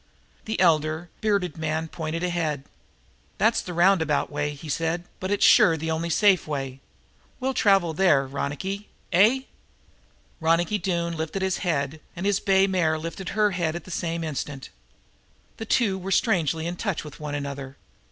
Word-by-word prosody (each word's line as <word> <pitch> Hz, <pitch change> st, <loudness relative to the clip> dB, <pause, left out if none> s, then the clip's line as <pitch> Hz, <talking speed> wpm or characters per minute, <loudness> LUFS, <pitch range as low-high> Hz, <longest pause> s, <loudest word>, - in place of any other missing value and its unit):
The 220 Hz, -, -3 dB
elder, 155 Hz, +2 st, +2 dB
bearded 200 Hz, -7 st, 0 dB
man, 160 Hz, +1 st, -1 dB
pointed 160 Hz, +1 st, -4 dB
ahead. 165 Hz, -6 st, -1 dB, 0.7 s
"That's -, -, +3 dB
the -, -, -7 dB
roundabout 170 Hz, -5 st, +3 dB
way," 145 Hz, 0 st, -2 dB
he 150 Hz, +3 st, -10 dB
said, 165 Hz, +3 st, -1 dB, 0.2 s
"but 185 Hz, -, -3 dB
it's 205 Hz, -, +3 dB
sure 165 Hz, -2 st, +6 dB
the 160 Hz, +1 st, -3 dB
only 165 Hz, +1 st, -2 dB
safe 195 Hz, -1 st, +3 dB
way. 135 Hz, -3 st, -4 dB, 0.6 s
We'll 265 Hz, +1 st, -1 dB
travel 195 Hz, -8 st, +3 dB
there, 155 Hz, -6 st, +3 dB
Ronicky, 145 Hz, +9 st, -4 dB, 0.2 s
eh?" 215 Hz, +9 st, +5 dB, 1.0 s
Ronicky 165 Hz, +5 st, +2 dB
Doone 170 Hz, -2 st, -1 dB
lifted 160 Hz, +4 st, -3 dB
his 190 Hz, -1 st, 0 dB
head, 155 Hz, -4 st, -2 dB
and 180 Hz, -, -4 dB
his 200 Hz, -1 st, +2 dB
bay 195 Hz, 0 st, +4 dB
mare 175 Hz, -5 st, +1 dB
lifted 165 Hz, +4 st, -6 dB
her 210 Hz, -1 st, +4 dB
head 170 Hz, -3 st, -1 dB
at 175 Hz, -, -5 dB
the 185 Hz, -, -11 dB
same 165 Hz, 0 st, -2 dB
instant. 145 Hz, -3 st, -5 dB, 0.9 s
The 225 Hz, -, -5 dB
two 200 Hz, -6 st, +2 dB
were 190 Hz, +1 st, -6 dB
strangely 170 Hz, -, +1 dB
in 175 Hz, +1 st, -3 dB
touch 200 Hz, -5 st, -2 dB
with 150 Hz, +1 st, -11 dB
one 150 Hz, -1 st, -4 dB
another. 140 Hz, -1 st, -5 dB
165 Hz, 160 wpm, -25 LUFS, 155-190 Hz, 1.0 s, sure